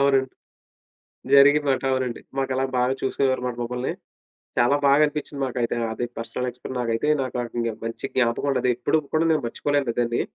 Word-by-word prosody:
అవునండి. 135 -1 +3 1.0
జరిగిందన్నమాట. 140 0 +5
అవునండి. 130 -2 -2 0.2
మాకలాగ 135 0 0
బాగా 125 +1 +2
చూసుకునేవారు 130 -1 0
మాట 125 - -4
మమ్మల్ని. 125 +2 -3 0.6
చాలా 120 +4 +4
బాగా 140 +2 +5
అనిపిచ్చింది 145 -1 -5
మాకైతే 120 -2 -1 0.2
అది. 120 - -2
పర్సనల్ 125 +2 -3
ఎక్స్‌పర్ 125 +1 -8
నాకైతే 115 +4 0
నాకేకంగా 120 -2 -2
మంచి 115 +3 -4
జ్ఞాపకమండది. 125 +1 +1
ఎప్పుడుకు 150 +5 +1
కూడా 165 +1 +3
నేను 155 - +1
మర్చిపోలేను 140 0 -1
దాన్ని. 120 0 +1
130 Hz, 140 wpm, -24 LUFS, 120-140 Hz, 1.0 s, జరిగిందన్నమాట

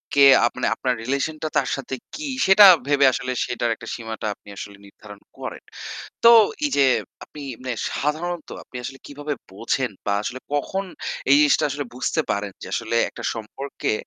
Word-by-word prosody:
কে 140 -1 +7 0.2
আপনে 125 - -4
আপনার 130 -1 0
রিলেশনটা 140 +5 -2
তার - - +1
সাথে 135 -1 -5 0.2
কি 305 -1 -5 0.2
সেটা 195 +2 +8 0.2
ভেবে 140 -1 +4
আসলে 130 - -3
সেটার 120 -1 -1
একটা 115 - -12
সীমাটা 110 -2 -6
আপনি 100 - -18
আসলে 100 0 -8
নির্ধারণ 100 +1 -14 0.2
করেন। - - -7 0.6
তো 230 - +9 0.4
এই - - +1
যে 140 - +6 0.4
আপনি 150 - -11 0.2
মানে 130 -1 -2 0.2
সাধারণত 160 +3 -2
আপনি - - -20
আসলে 135 +2 -7
কিভাবে 145 +1 -4 0.2
বোঝেন 115 +5 -1
বা 100 - +1
আসলে 130 +4 -4 0.2
কখন 190 +7 -2 0.5
এই - - +8
জিনিসটা 150 -1 +4
আসলে 145 +1 -3
বুঝতে 145 +5 0
পারেন 100 0 -2
যে - - -7
আসলে 115 0 -2
একটা - - -10
সম্পর্কে 120 +5 -4
135 Hz, 165 wpm, -23 LUFS, 115-150 Hz, 0.6 s, তো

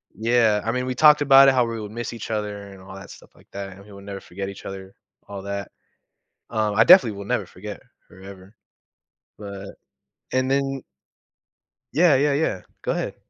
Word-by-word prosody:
yeah, 110 -1 +2
I 115 - 0
mean, 125 +1 -2
we 130 - -2
talked 150 +2 +6
about 135 -1 +7
it, 135 - +5
how 125 -2 +3
we 115 -1 -4
would 105 -1 -7
miss 120 +2 -5
each 115 - -8
other 105 -2 -4
and 95 -1 -13
all 95 +1 -11
that 100 +1 -11
stuff - - -15
like - - -22
that, 100 0 -6
and 95 +1 -13
we 105 - -16
will 100 0 -12
never 100 0 -7
forget 95 +1 -7
each 100 - -11
other 95 0 -8 0.3
all 100 -1 -7
that, 100 0 -5 0.8
uh, 110 -2 -1
I 110 +2 +5
definitely 120 - +6
will 100 - -7
never 120 -3 -1
forget 105 +4 -10 0.3
her, 95 - -16
ever, 95 0 -13 0.9
but 100 -1 -8 0.6
and 130 0 0
then 135 -1 -1 1.1
Yeah, 165 -1 +4
yeah, 145 +2 +2
yeah. 140 - -1 0.2
Go - - -1
ahead. - - -4
105 Hz, 200 wpm, -23 LUFS, 100-125 Hz, 1.1 s, about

